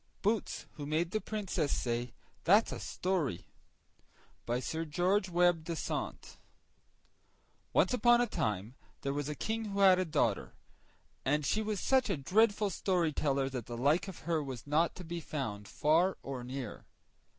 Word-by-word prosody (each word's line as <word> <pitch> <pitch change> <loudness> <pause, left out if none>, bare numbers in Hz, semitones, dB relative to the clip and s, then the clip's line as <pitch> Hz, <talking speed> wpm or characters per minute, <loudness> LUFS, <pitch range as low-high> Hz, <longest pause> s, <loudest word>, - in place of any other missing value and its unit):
BOOTS 215 0 0
WHO 145 - -5
MADE 165 +3 0
THE 215 - -1
PRINCESS 190 -8 -2
SAY 120 0 -1 0.3
"THAT'S 205 +6 +5
A - - -4
STORY" 170 - -2 1.0
By 120 +1 +1
Sir 160 +5 -3
George 180 +5 +1
Webbe 175 -2 +3
Dasent 165 -1 -4 1.3
Once - - +3
upon 240 -1 +5
a 245 - +4
time 105 - -2 0.3
there 140 - -1
was 145 0 -2
a 150 - -3
King 225 +7 -2
who 200 -1 -2
had 190 -2 +7
a 185 - +1
daughter, 130 - 0 0.7
and 150 +3 +1
she 215 - +1
was 215 -2 -2
such 260 +1 +2
a 195 - +1
dreadful 205 +7 +2
storyteller 155 -7 +1
that 125 -4 -5
the 120 -1 -5
like 145 +10 +2
of 190 - -8
her 160 0 0
was 130 -5 -6
not 155 +4 +2
to 180 - -8
be 170 0 -4
found 115 -10 -4
far 165 - +2
or 130 -2 -5
near. 125 -2 -6
160 Hz, 160 wpm, -32 LUFS, 135-195 Hz, 1.3 s, had